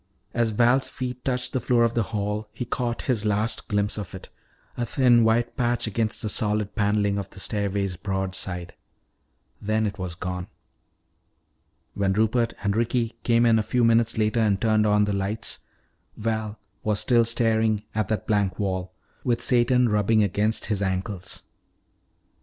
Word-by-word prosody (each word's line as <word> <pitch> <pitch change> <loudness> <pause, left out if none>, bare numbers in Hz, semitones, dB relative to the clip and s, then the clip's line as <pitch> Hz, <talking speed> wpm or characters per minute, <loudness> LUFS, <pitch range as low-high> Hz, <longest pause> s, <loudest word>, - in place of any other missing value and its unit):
As 120 -1 +1
Val's 120 +4 +3
feet 125 -1 -5
touched 125 -1 -1
the 130 - +1
floor 120 -1 +2
of 115 0 +2
the 120 - +1
hall 105 0 -3
he 125 - -4
caught 120 0 -2
his 120 -6 0
last 105 +1 0
glimpse 105 0 0
of 95 -2 -7
it, 95 - -10 0.5
a 120 - -2
thin 120 -1 +4
white 115 +1 +2
patch 120 -1 +1
against 110 0 -1
the - - -1
solid 105 -1 -1
paneling 105 -1 +1
of 100 -1 -6
the 95 - -13
stairway's 100 -2 -2
broad 95 0 -2
side. 90 -2 -3 0.9
Then 110 +1 0
it 100 -1 -4
was 90 -2 -4
gone. 90 0 -4 1.5
When 100 -1 0
Rupert 110 +3 +1
and 100 0 +1
Ricky 115 0 0
came 120 0 +3
in 115 -1 +5
a - - +2
few 115 +3 0
minutes 115 0 +3
later 110 +1 +1
and 105 -3 +2
turned 110 -1 +2
on 105 0 +4
the 105 - -1
lights, 100 +3 -3 0.6
Val 110 -1 -2 0.3
was 105 -1 +1
still 120 -2 +4
staring 110 -2 +1
at 110 -2 0
that 110 - -2
blank 100 -4 0
wall, 95 -2 -2 0.3
with 120 -2 +1
Satan 125 0 +3
rubbing 105 0 +3
against 105 +3 0
his 105 -3 -1
ankles. 95 -1 -3
110 Hz, 165 wpm, -25 LUFS, 100-115 Hz, 1.5 s, in